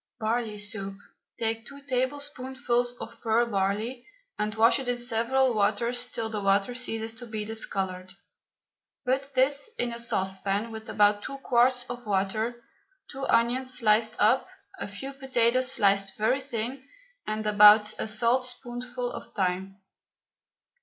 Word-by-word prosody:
BARLEY 220 Hz, -1 st, -1 dB
SOUP. 205 Hz, -1 st, -2 dB, 0.4 s
Take 225 Hz, 0 st, -2 dB
two 280 Hz, 0 st, -11 dB
tablespoonfuls 260 Hz, -2 st, -1 dB
of 230 Hz, -, -9 dB
pearl 230 Hz, +1 st, +3 dB
barley 215 Hz, +4 st, -2 dB, 0.3 s
and 210 Hz, 0 st, -1 dB
wash 230 Hz, +4 st, +4 dB
it 265 Hz, -, -6 dB
in 245 Hz, 0 st, 0 dB
several 240 Hz, +2 st, +1 dB
waters 235 Hz, +4 st, +1 dB
till 230 Hz, -2 st, -4 dB
the 215 Hz, -2 st, -4 dB
water 195 Hz, +3 st, +2 dB
ceases 225 Hz, -3 st, -3 dB
to 240 Hz, +1 st, -9 dB
be 215 Hz, -2 st, -4 dB
discoloured. 190 Hz, -4 st, -3 dB, 0.9 s
Put 270 Hz, +2 st, 0 dB
this 275 Hz, -, +2 dB
in 240 Hz, -1 st, +1 dB
a 235 Hz, -, -6 dB
saucepan 195 Hz, 0 st, -1 dB
with 220 Hz, 0 st, -8 dB
about 205 Hz, 0 st, +3 dB
two 275 Hz, -, -6 dB
quarts 250 Hz, -1 st, +2 dB
of 245 Hz, -2 st, -7 dB
water, 215 Hz, +5 st, -1 dB, 0.5 s
two 270 Hz, 0 st, -4 dB
onions 255 Hz, +3 st, +1 dB
sliced 220 Hz, -1 st, +3 dB
up, 225 Hz, -, +3 dB, 0.3 s
a -, -, -4 dB
few 235 Hz, +8 st, -7 dB
potatoes 255 Hz, -1 st, +2 dB
sliced 195 Hz, -4 st, +2 dB
very 225 Hz, +6 st, +1 dB
thin, 245 Hz, +3 st, -4 dB, 0.4 s
and 215 Hz, 0 st, -2 dB
about 210 Hz, 0 st, +7 dB
a -, -, -1 dB
saltspoonful 245 Hz, +1 st, -1 dB
of -, -, -8 dB
thyme. 190 Hz, 0 st, -1 dB
230 Hz, 140 wpm, -27 LUFS, 210-250 Hz, 0.9 s, about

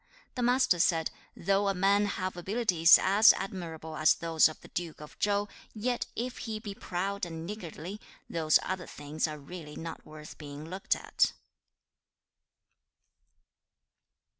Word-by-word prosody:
The 250 Hz, -, -3 dB
Master 245 Hz, -7 st, +3 dB
said, 165 Hz, -1 st, +2 dB, 0.3 s
'Though 195 Hz, +3 st, +1 dB
a 195 Hz, -, +1 dB
man 200 Hz, +2 st, +3 dB
have 185 Hz, -2 st, -3 dB
abilities 180 Hz, -3 st, +5 dB
as 205 Hz, +3 st, +7 dB
admirable 165 Hz, -5 st, -6 dB
as 155 Hz, 0 st, +4 dB
those 165 Hz, -2 st, +3 dB
of 155 Hz, -, -10 dB
the -, -, -13 dB
Duke 170 Hz, -2 st, -5 dB
of 150 Hz, 0 st, -11 dB
Chau, 205 Hz, 0 st, +1 dB, 0.3 s
yet 240 Hz, +3 st, -1 dB
if 245 Hz, +2 st, -4 dB
he 220 Hz, -3 st, -4 dB
be 210 Hz, -2 st, -6 dB
proud 195 Hz, -1 st, -3 dB
and 165 Hz, -2 st, -4 dB
niggardly, 190 Hz, 0 st, -7 dB, 0.3 s
those 155 Hz, -2 st, +3 dB
other 185 Hz, -2 st, -4 dB
things 150 Hz, +2 st, -3 dB
are 155 Hz, -1 st, -6 dB
really 150 Hz, +1 st, -9 dB
not 165 Hz, 0 st, -7 dB
worth 155 Hz, 0 st, -11 dB
being 145 Hz, 0 st, -8 dB
looked 190 Hz, +3 st, -1 dB
at.' -, -, +1 dB
180 Hz, 140 wpm, -30 LUFS, 160-200 Hz, 0.3 s, as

